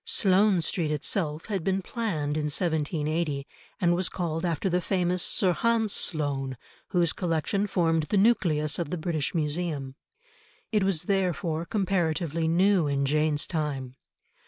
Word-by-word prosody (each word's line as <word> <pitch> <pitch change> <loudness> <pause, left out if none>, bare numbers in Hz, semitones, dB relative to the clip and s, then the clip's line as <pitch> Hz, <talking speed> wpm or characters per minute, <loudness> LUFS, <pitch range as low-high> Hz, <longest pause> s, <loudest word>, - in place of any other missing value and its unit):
Sloane 195 -1 +3
Street 160 0 0
itself 150 +1 -1
had 195 -6 -3
been 190 +1 0
planned 165 -11 -2
in 155 -1 -1
1780, 155 -1 -1 0.3
and 175 -1 +3
was 180 0 +1
called 165 -2 -3
after 170 +1 -1
the 180 -1 +1
famous 180 -1 0
Sir 185 +1 +2
Hans 225 0 +1
Sloane, 140 -5 -1 0.3
whose 175 -3 +2
collection 180 +4 -1
formed 165 -4 +1
the 205 - +2
nucleus 175 -9 +2
of 170 - -2
the 180 - -2
British 160 -1 -2
Museum. 150 -3 -2 0.8
It 210 -2 +2
was 190 -5 +1
therefore 175 -5 -1
comparatively 170 -5 0
new 180 0 +3
in 140 -1 0
Jane's 150 +1 +1
time. 140 -6 -3
165 Hz, 140 wpm, -27 LUFS, 150-185 Hz, 0.8 s, Sloane